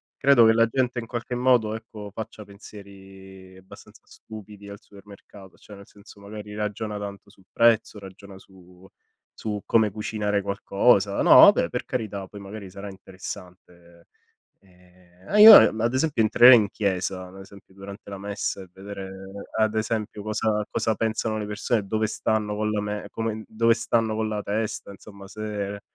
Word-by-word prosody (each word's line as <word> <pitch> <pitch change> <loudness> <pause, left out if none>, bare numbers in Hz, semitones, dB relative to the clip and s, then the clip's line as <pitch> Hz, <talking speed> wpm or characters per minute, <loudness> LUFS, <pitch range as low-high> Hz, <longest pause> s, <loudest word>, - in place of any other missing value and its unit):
credo 135 -4 +5
che 110 - +5
la 115 0 +4
gente 125 0 -1
in 115 - -8
qualche 120 +1 -5
modo 120 -4 +2
ecco 105 -2 -10
faccia 105 0 -9
pensieri 95 -2 -14
abbastanza 95 0 -16
stupidi 105 -2 -13
al 100 +1 -10
supermercato, 100 -1 -16
cioè 105 - -14
nel 100 0 -15
senso 100 0 -18
magari 105 0 -10
ragiona 105 0 -4
tanto 100 0 -8
sul 95 -2 -23
prezzo, 115 -2 +2
ragiona 95 0 -13
su 90 -1 -19 0.5
su 105 -2 -5
come 110 -3 +2
cucinare 105 -1 -2
qualcosa. 100 0 +1
No - - +6
vabbè - - +6
per - - -5
carità 105 -5 -5
poi 100 - -11
magari 100 -1 -9
sarà 100 +2 -9
interessante, 90 -3 -12 0.5
ehm, 90 - -10
io 215 +1 +12
ad 110 +2 +4
esempio 135 -3 0
entrerei 120 +3 +7
in 105 -3 +2
chiesa, 95 -2 -3
ad 95 +1 -14
esempio 95 -1 -16
durante 100 +1 -11
la 100 - -7
messa 100 -1 -4
e 95 - -13
vedere 95 0 -9 0.5
ad 110 0 +1
esempio 110 -1 -3
cosa 105 0 -1
cosa 110 - -1
pensano 110 0 -2
le 105 - -5
persone, 105 0 -2
dove 110 +1 -1
stanno 105 -1 -2
con 105 0 -2
la 105 - -1
me 105 0 -5
come 110 -1 -4
dove 115 +1 +2
stanno 115 -1 -1
con 110 0 -2
la 105 -1 -3
testa, 105 -1 -4
insomma 100 0 -14
se 100 -1 -6
105 Hz, 160 wpm, -24 LUFS, 100-110 Hz, 0.5 s, io